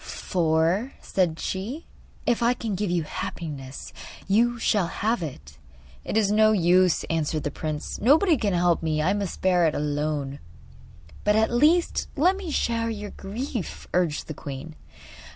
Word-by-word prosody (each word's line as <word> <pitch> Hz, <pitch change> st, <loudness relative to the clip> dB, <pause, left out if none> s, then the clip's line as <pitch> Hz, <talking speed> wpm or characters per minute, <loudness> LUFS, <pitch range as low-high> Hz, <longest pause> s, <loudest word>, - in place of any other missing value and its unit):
'For,' 170 Hz, -, 0 dB
said 175 Hz, -4 st, 0 dB
she, 225 Hz, -, -4 dB, 0.4 s
'if 240 Hz, 0 st, +1 dB
I 240 Hz, +1 st, +3 dB
can 225 Hz, -4 st, -3 dB
give 195 Hz, +1 st, -1 dB
you 175 Hz, -2 st, +1 dB
happiness 145 Hz, -4 st, -6 dB, 0.3 s
you 235 Hz, +4 st, +3 dB
shall 210 Hz, -5 st, +1 dB
have 220 Hz, +4 st, -1 dB
it.' 75 Hz, -, -8 dB, 0.4 s
'It -, -, -2 dB
is 205 Hz, -2 st, +3 dB
no 215 Hz, +1 st, +5 dB
use,' 180 Hz, -2 st, +4 dB
answered 155 Hz, -1 st, -1 dB
the 145 Hz, -, -2 dB
prince; 155 Hz, +1 st, -4 dB
'nobody 310 Hz, -, +5 dB
can 210 Hz, -7 st, 0 dB
help 175 Hz, -1 st, +2 dB
me. 155 Hz, -2 st, 0 dB
I 185 Hz, +5 st, +2 dB
must 200 Hz, -3 st, -3 dB
bear 180 Hz, -3 st, +4 dB
it 155 Hz, -, -1 dB
alone.' 145 Hz, -1 st, -2 dB, 0.8 s
'But 210 Hz, 0 st, +3 dB
at 220 Hz, +1 st, +3 dB
least 310 Hz, +8 st, +3 dB
let 350 Hz, +6 st, +3 dB
me 385 Hz, -3 st, -6 dB
share 230 Hz, -5 st, 0 dB
your 210 Hz, -2 st, -5 dB
grief,' 225 Hz, +1 st, -5 dB
urged 175 Hz, -4 st, +1 dB
the 155 Hz, -, -5 dB
queen. 145 Hz, +2 st, -7 dB
185 Hz, 155 wpm, -25 LUFS, 160-230 Hz, 0.8 s, no